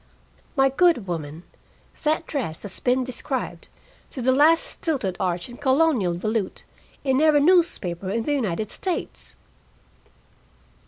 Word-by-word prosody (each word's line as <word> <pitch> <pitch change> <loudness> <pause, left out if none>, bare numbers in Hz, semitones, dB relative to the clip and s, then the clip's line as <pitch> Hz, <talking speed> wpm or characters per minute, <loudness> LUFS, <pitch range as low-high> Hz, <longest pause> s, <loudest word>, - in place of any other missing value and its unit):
"My 270 -1 +4
good 310 - +3
woman, 160 -2 -5 0.6
that 310 +2 0
dress 235 - -4
has 200 -3 -5
been 255 +1 +1
described, 255 0 -4 0.4
to - - -8
the 255 +1 +2
last 305 +5 +5
stilted 260 - -2
arch 175 -1 -1
and 245 -1 -12
Colonial 260 - +2
volute, 215 +2 -2 0.4
in 265 0 +2
every 310 -2 +5
newspaper 250 - +2
in 225 +3 -1
the 295 - 0
United 215 -6 -2
States!" 370 -2 -4
255 Hz, 125 wpm, -24 LUFS, 190-295 Hz, 0.6 s, last